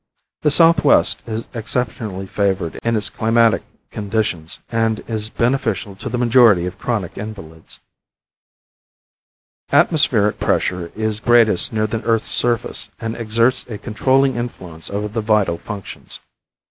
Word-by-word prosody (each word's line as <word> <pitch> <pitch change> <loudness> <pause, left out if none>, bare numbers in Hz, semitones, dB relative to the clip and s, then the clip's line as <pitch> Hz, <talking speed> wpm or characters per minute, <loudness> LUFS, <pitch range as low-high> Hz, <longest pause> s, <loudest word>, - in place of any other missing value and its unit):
The 150 - +3
southwest 165 -1 +4
is 110 0 -4
exceptionally 110 -4 -3
favored 95 -4 -1
in 115 0 +1
its 105 -1 0
climatic 115 -1 +2 0.3
conditions, 100 -6 -3
and 115 -1 -1
is 110 -1 -3
beneficial 115 -5 -1
to - - -6
the 125 - -2
majority 120 -7 +5
of 90 +2 -6
chronic 105 -8 -3
invalids. 95 -7 -10 1.9
Atmospheric 115 -10 +3
pressure 90 -2 -1
is 110 -1 -2
greatest 115 -5 +4
near 110 -1 0
the 110 +1 -3
earth's 115 -1 +1
surface, 120 -2 0
and 115 0 -4
exerts 115 +2 +2
a 110 - -5
controlling 130 +4 +1
influence 90 -9 -6
over 105 +1 -3
the 110 +2 -3
vital 105 -6 +1
functions. 100 -3 -7
110 Hz, 125 wpm, -19 LUFS, 100-120 Hz, 1.9 s, majority